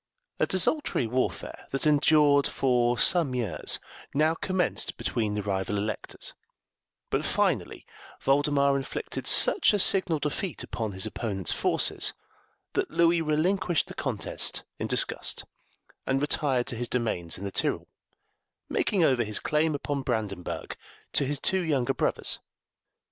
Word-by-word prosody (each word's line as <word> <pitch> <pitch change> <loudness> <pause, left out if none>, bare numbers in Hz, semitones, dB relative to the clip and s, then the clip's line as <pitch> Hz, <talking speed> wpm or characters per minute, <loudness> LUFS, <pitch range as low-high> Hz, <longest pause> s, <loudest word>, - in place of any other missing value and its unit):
A - - +2
desultory 190 - +2
warfare, 125 +3 -3
that 135 - -1
endured 150 -1 +4
for 120 -2 +1
some 160 -5 +4
years, 120 -4 -1 0.4
now 155 +2 +3
commenced 185 +1 -1
between 110 -3 -2
the 105 - -2
rival 100 0 -2
electors, 105 +1 -4 0.8
but - - 0
finally - - -1 0.3
Voldemar 140 0 +2
inflicted 135 -1 -4
such - - +5
a - - +3
signal 185 -4 +4
defeat 150 +4 -3
upon 110 -4 -4
his 95 0 +1
opponent's 100 -7 -2
forces - - +1 0.6
that - - -1
Louis 170 0 +3
relinquished 170 +3 +1
the - - -10
contest - - -2 0.2
in - - -2
disgust, - - 0 0.6
and 135 +1 +1
retired 140 -3 +1
to 125 - -3
his 120 +1 -3
domains 110 -9 -1
in 95 - -9
the 100 - -4
Tyrol, - - 0 0.8
making 190 -4 +1
over 130 -6 +3
his 105 -1 -1
claim 150 0 +1
upon 140 0 -3
Brandenburg 105 -8 -4 0.4
to 140 - +3
his 145 +1 -1
two 190 +5 +2
younger 140 -8 0
brothers. - - -1
140 Hz, 135 wpm, -27 LUFS, 115-160 Hz, 0.8 s, such